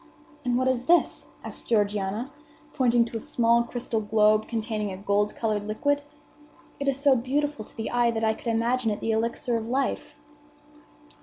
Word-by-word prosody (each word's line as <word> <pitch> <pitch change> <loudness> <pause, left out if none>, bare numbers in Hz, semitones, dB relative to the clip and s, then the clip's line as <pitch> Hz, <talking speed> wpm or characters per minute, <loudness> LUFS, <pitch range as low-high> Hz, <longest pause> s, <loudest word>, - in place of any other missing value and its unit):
"And 245 -1 +1
what 255 +1 +1
is 255 -1 0
this?" 345 +4 +2 0.2
asked - - -6
Georgiana, 210 +2 0 0.4
pointing 240 -4 +3
to 230 - -5
a - - -5
small 235 +1 +2
crystal 235 -2 -3
globe 215 0 +3
containing 215 -3 -2
a 185 - -6
gold 205 +1 0
colored 210 -2 -1
liquid. 285 +7 0 0.8
"It 280 - -3
is 275 0 +2
so 280 -1 +5
beautiful 275 +1 -1
to - - -17
the 225 - -3
eye 240 -1 +3
that 225 -1 -2
I 220 0 +3
could 225 - -11
imagine 230 +1 +1
it 210 - -2
the 225 - -1
elixir 230 +2 0
of 225 0 -5
life." 275 +3 -2
230 Hz, 175 wpm, -26 LUFS, 215-255 Hz, 0.8 s, so